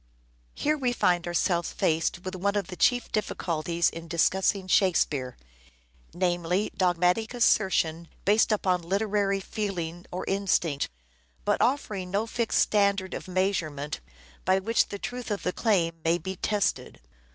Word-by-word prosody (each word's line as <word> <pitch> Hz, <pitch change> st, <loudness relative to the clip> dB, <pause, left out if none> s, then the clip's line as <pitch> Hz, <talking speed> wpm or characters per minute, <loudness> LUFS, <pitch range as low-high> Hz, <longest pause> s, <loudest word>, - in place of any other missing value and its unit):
Here 305 Hz, 0 st, 0 dB
we 250 Hz, -2 st, +1 dB
find 175 Hz, -6 st, +1 dB
ourselves 175 Hz, 0 st, 0 dB
faced 165 Hz, +3 st, 0 dB
with 185 Hz, -, -4 dB
one 200 Hz, +2 st, -1 dB
of 200 Hz, -4 st, -1 dB
the 180 Hz, -, -6 dB
chief 245 Hz, +5 st, +2 dB
difficulties 170 Hz, -5 st, -1 dB
in 165 Hz, 0 st, -4 dB
discussing 185 Hz, +3 st, +1 dB
Shakespeare: 155 Hz, -9 st, +2 dB, 0.7 s
namely, 175 Hz, +2 st, 0 dB
dogmatic 180 Hz, +5 st, +1 dB
assertion 170 Hz, -8 st, +2 dB, 0.2 s
based 210 Hz, +3 st, +4 dB
upon 185 Hz, -4 st, +1 dB
literary 200 Hz, +2 st, 0 dB
feeling 180 Hz, -4 st, -4 dB
or 180 Hz, -, -4 dB
instinct, 180 Hz, -7 st, 0 dB, 0.6 s
but -, -, +1 dB
offering 210 Hz, -8 st, 0 dB
no 200 Hz, +4 st, 0 dB
fixed 230 Hz, 0 st, -1 dB
standard 200 Hz, -2 st, +2 dB
of -, -, -6 dB
measure 185 Hz, -2 st, 0 dB
ment 145 Hz, 0 st, -5 dB, 0.4 s
by 190 Hz, -, +3 dB
which 225 Hz, +4 st, +2 dB
the 200 Hz, -, -6 dB
truth 245 Hz, +3 st, -5 dB
of 205 Hz, -2 st, -2 dB
the 180 Hz, -, -1 dB
claim 170 Hz, -7 st, +1 dB
may 165 Hz, +1 st, +3 dB
be 190 Hz, +3 st, -5 dB
tested. 205 Hz, +1 st, -1 dB
185 Hz, 140 wpm, -27 LUFS, 170-205 Hz, 0.7 s, based